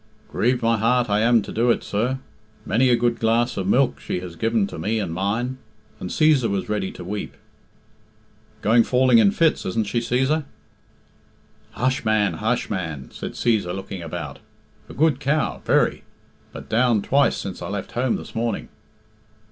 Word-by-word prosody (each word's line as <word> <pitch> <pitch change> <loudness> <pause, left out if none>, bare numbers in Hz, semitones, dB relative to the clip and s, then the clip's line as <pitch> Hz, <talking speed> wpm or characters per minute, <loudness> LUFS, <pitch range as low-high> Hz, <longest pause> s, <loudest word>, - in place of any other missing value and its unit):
"Grieved 125 +1 0
in - - +2
my 115 0 +3
heart 120 +1 +2
I 105 - +3
am 115 0 +4
to - - -8
do 120 +2 +1
it, 115 - +2
sir. 120 +6 -1 0.5
Many 125 +5 +2
a 120 - +5
good 120 0 0
glass 115 +2 +1
of 95 -2 -3
milk 125 +5 +2
she - - -3
has 90 -2 -8
given 110 +2 +1
to 100 - -8
me 105 +7 -1
and 95 -6 -3
mine," 115 +8 -2 0.4
and - - -5
Cæsar 150 -7 +3
was 100 -1 -2
ready 105 -3 -1
to - - -9
weep. 100 +3 -5 1.3
"Going 115 +3 +5
falling 125 -1 +4
in 105 -3 +6
fits, 160 +9 +2
isn't 110 +4 -1
she, 110 +4 -1
Cæsar?" 130 +6 0 1.3
"Hush, 130 +2 0
man! 110 -2 +2
hush, 115 +3 0
man!" 80 - -5
said - - -7
Cæsar, 105 -7 0
looking 95 -1 -6
about. 80 -2 -6 0.5
"A - - -10
good 150 -1 +2
cow, 150 +2 0
very; - - +2 0.5
but - - -9
down 115 -2 +2
twice 140 +1 +2
since 95 -2 -6
I - - -4
left 100 -1 -5
home 125 +1 0
this - - -8
morning." 115 0 -2
115 Hz, 175 wpm, -23 LUFS, 100-125 Hz, 1.3 s, in